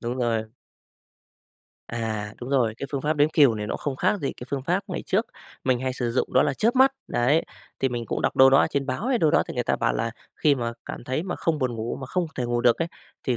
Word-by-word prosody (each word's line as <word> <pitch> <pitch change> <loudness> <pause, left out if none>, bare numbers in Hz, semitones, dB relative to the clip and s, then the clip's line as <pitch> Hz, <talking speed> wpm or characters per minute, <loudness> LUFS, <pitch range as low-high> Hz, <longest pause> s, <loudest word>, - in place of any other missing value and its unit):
Đúng 120 +2 -3
rồi. 115 -2 0 1.4
À, 110 -2 -3
đúng 125 - -6
rồi, 120 -5 +2
cái 140 - -5
phương 140 - -2
pháp 150 +1 0
đếm 145 +1 +4
cừu 140 -8 +5
này 105 0 -4
nó - - -2
không 140 -3 -3
khác 210 - +1
gì 140 - -2
cái 125 - -10
phương 135 -2 -2
pháp 180 +6 +1
ngày 180 - -4
trước 220 +4 +1 0.4
mình 130 -2 +2
hay 130 0 -1
sử 120 -2 -2
dụng 125 - -1
đó 130 - +5
là 145 -2 0
chớp 235 - +1
mắt. 265 +1 +6 0.2
Đấy, 140 +7 +2 0.4
thì 135 - +2
mình 120 -2 -4
cũng - - -2
đọc - - 0
đâu 135 0 +8
đó 135 - +6
ở - - +4
trên 140 -1 -1
báo 140 - -2
hay 255 -3 +2
đâu 155 - +3
đó - - +4
thì - - -5
người - - -1
ta - - +1
bảo - - +1
là 115 - -1 0.3
khi 145 -2 +4
mà 120 -2 -2
cảm - - -7
thấy 130 +5 -1
mà 180 0 -4
không 160 -2 0
buồn 130 -3 0
ngủ 115 +1 -3
mà 130 - -5
không 180 +3 -1
thể 125 - -2
ngủ 120 0 0
được 120 -1 +4
ấy, 165 0 -1 0.3
thì 125 -3 0
130 Hz, 275 wpm, -25 LUFS, 120-155 Hz, 1.4 s, đâu